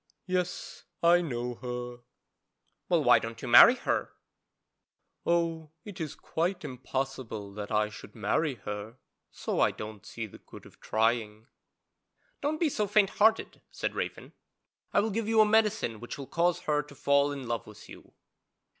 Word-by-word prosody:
'Yes, 180 -1 -3 0.2
I 175 +1 +6
know 125 -6 -3
her.' 125 -1 -5 0.9
'Well, - - +3
why - - +6
don't 115 0 -7
you 125 - -6
marry 120 - +9
her?' - - -2 1.1
'Oh, 165 -2 0 0.2
it 200 -5 -8
is 155 -3 -4
quite 170 +1 -2
impossible 130 -5 -4
that 105 0 -6
I 105 0 +2
should - - -12
marry 155 -4 0
her, 105 +3 -6 0.3
so - - -3
I - - +5
don't 105 -1 -8
see 115 - -6
the 105 - -13
good - - -14
of - - -17
trying.' 110 -1 0 1.0
'Don't 305 +2 -1
be 335 - +3
so 210 -6 -1
faint 205 -1 +3
hearted,' 220 +1 +3
said - - -3
Raven, - - -5 0.6
'I - - +4
will 220 +1 -1
give 220 +1 -2
you 225 0 +3
a 215 - +8
medicine 210 - +2
which 120 +5 -7
will 140 - -6
cause 170 +4 +1
her 150 -1 +1
to 145 0 -15
fall 140 +1 +3
in 140 -3 -6
love 115 -1 -3
with 105 - -13
you.' - - -14
140 Hz, 165 wpm, -29 LUFS, 115-180 Hz, 1.1 s, marry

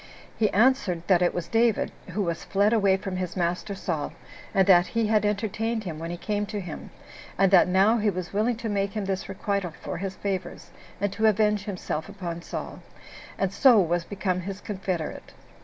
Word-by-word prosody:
He 215 -2 +2
answered 210 -6 +2
that 180 -2 +4
it 175 - +3
was 175 -2 -4
David, 230 -1 +2 0.2
who 200 +4 -1
was 170 -2 -3
fled 205 +3 +2
away 200 -4 +4
from 190 -1 -5
his 185 0 -4
master 175 +3 -1
Saul, 165 -6 -3 0.4
and 190 -1 +3
that 180 -2 +6
he 230 -1 0
had 210 -1 +2
entertained 220 +2 -1
him 165 -5 -5
when 165 +1 -5
he 175 - -4
came 205 +2 -2
to 205 0 -4
him, 175 -5 -7 0.5
and 195 0 +4
that 190 - +7
now 195 +5 +4
he 210 0 +2
was 185 -2 -4
willing 220 +4 +1
to 230 0 -5
make 200 -2 -1
him 210 -2 -2
this 190 0 -3
requital 195 -2 -2
for - - -5
his 190 0 -4
favors, 190 -3 -4 0.3
and 200 0 -1
to 220 +1 +2
avenge 210 -1 +2
himself 180 -4 -4
upon 175 -4 -5
Saul, - - -6 0.6
and 195 -1 -1
so 245 -1 +6
was 175 -1 +1
become 185 -1 -2
his 190 +2 -5
confederate. 185 -6 -4
195 Hz, 195 wpm, -26 LUFS, 180-210 Hz, 0.6 s, that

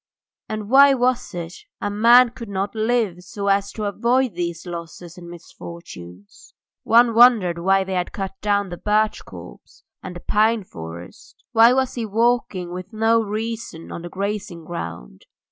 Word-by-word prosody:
And 215 -1 -5
why 275 +1 +7
was 250 0 0
it 170 0 -6 0.3
a 205 - -3
man 235 +4 +6
could 235 -3 -10
not 195 0 -3
live 220 -5 0
so 200 +3 -4
as 200 0 +1
to 215 - -5
avoid 235 +3 0
these 170 -1 -4
losses 170 0 -8
and 175 -1 -11
misfortunes? 100 - -12 0.3
One 235 0 +4
wondered 220 -8 +5
why 195 +2 +2
they 190 0 -5
had 180 -1 -2
cut 195 -1 -5
down 205 -1 0
the 175 - -7
birch 215 +2 0
copse - - -13 0.2
and 180 -1 -8
the - - -7
pine 215 +1 +1
forest. 85 - -11
Why 230 +1 +6
was 260 0 0
he 235 -3 -4
walking 215 -5 0
with 185 +1 -7
no 225 +1 +2
reason 220 -5 -5
on - - -6
the 175 - -8
grazing 195 -3 -5
ground? 85 - -8
200 Hz, 160 wpm, -21 LUFS, 175-230 Hz, 0.3 s, why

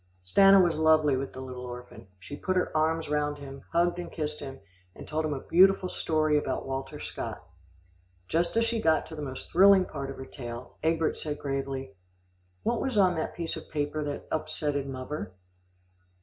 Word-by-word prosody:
Stanna 195 - +7
was 175 -3 +4
lovely 155 -2 +4
with 135 +1 -3
the 130 - -8
little 130 -1 -7
orphan. 125 -4 -9
She 90 +10 -8
put 185 +5 -2
her 180 -3 0
arms 160 +1 +1
round 150 0 0
him, 140 -1 -9
hugged 175 +1 +2
and 175 - -6
kissed 150 -2 -3
him, 135 -2 -7 0.4
and - - -10
told 155 +1 -1
him 155 -1 -1
a 135 - -5
beautiful 185 +1 +5
story 155 -3 +1
about - - -3
Walter 135 0 -4
Scott. - - -6 0.8
Just 170 - 0
as 230 - +4
she 230 -1 -1
got 160 -5 +3
to 160 - -9
the 150 - -6
most 130 -3 -6
thrilling 190 +1 +7
part 140 -2 -5
of 135 - -7
her 130 - -7
tale, 120 -2 -8
Egbert 160 0 +1
said 150 -1 -3
gravely, 135 -4 -3 0.7
"What 235 0 0
was 260 -5 -1
on 185 -3 +5
that 160 - -3
piece 165 -1 -3
of - - -9
paper 150 0 -2
that 145 -1 -5
upsetted 150 -3 -2
muvver?" 130 -6 -5
150 Hz, 190 wpm, -28 LUFS, 135-170 Hz, 0.8 s, Stanna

